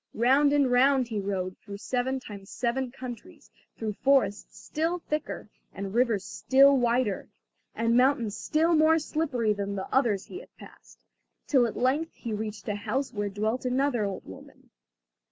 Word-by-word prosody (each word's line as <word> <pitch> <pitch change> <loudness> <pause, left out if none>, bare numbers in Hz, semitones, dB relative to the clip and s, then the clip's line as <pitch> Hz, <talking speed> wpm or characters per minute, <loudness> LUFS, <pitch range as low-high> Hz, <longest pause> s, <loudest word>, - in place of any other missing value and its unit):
Round 270 +5 +4
and 285 -3 +3
round 260 0 +4
he 215 -3 -2
rode, 190 -2 -3
through 200 -2 -9
seven 255 +5 -2
times 200 -5 -10
seven 255 +2 -2
countries, 260 +7 -10 0.3
through 220 -2 -3
forests 265 -4 +1
still 325 +3 -2
thicker, 305 -3 -4 0.3
and 195 0 -5
rivers 230 -5 +1
still 275 +1 +4
wider, 240 -4 0 0.5
and 230 0 +1
mountains 250 -4 +2
still 320 +2 +1
more 315 0 +5
slippery 290 -8 0
than 200 0 -4
the 190 - -4
others 230 -7 +2
he 370 - -8
had - - -17
passed, - - -15 0.5
till 255 -5 +3
at 225 - -6
length 285 +6 0
he 230 -3 -5
reached 215 0 -5
a 210 - 0
house 260 +7 -3
where 205 -1 -2
dwelt 215 +5 -2
another 255 -2 +1
old 195 -2 -4
woman. 95 - -14
245 Hz, 160 wpm, -27 LUFS, 210-275 Hz, 0.5 s, more